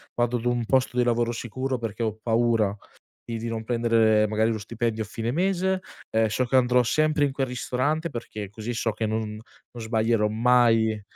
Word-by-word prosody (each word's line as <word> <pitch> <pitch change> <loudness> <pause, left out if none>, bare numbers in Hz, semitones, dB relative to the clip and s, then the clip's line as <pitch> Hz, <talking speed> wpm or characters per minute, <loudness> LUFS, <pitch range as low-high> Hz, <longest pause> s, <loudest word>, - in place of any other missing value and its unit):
vado 120 0 +1
ad 115 - -7
un 120 -1 0
posto 130 +1 +1
di 125 - +4
lavoro 120 0 +1
sicuro, 130 +3 -3
perché 115 -1 -5
ho 110 -2 -1
paura 115 -3 +2 0.5
di 115 -1 -4
di 115 - -5
non 115 -1 -4
prendere 115 -2 +3
magari 110 +2 +1
lo 110 - -1
stipendio 110 +1 -2
a - - -8
fine 115 +2 -3
mese, 190 +3 +1 0.3
ehm, 110 0 +3
so 110 +4 0
che 130 +2 +2
andrò 125 0 +4
sempre 155 +4 +2
in 140 - -1
quel 135 0 -2
ristorante, 130 +6 -1
perché 105 -5 -6
così 110 +3 -5
so 115 -1 -1
che 110 +1 -2
non 110 0 -2 0.4
non 120 - -9
sbaglierò 110 -1 +1
mai 115 -1 +3
115 Hz, 195 wpm, -25 LUFS, 110-125 Hz, 0.5 s, di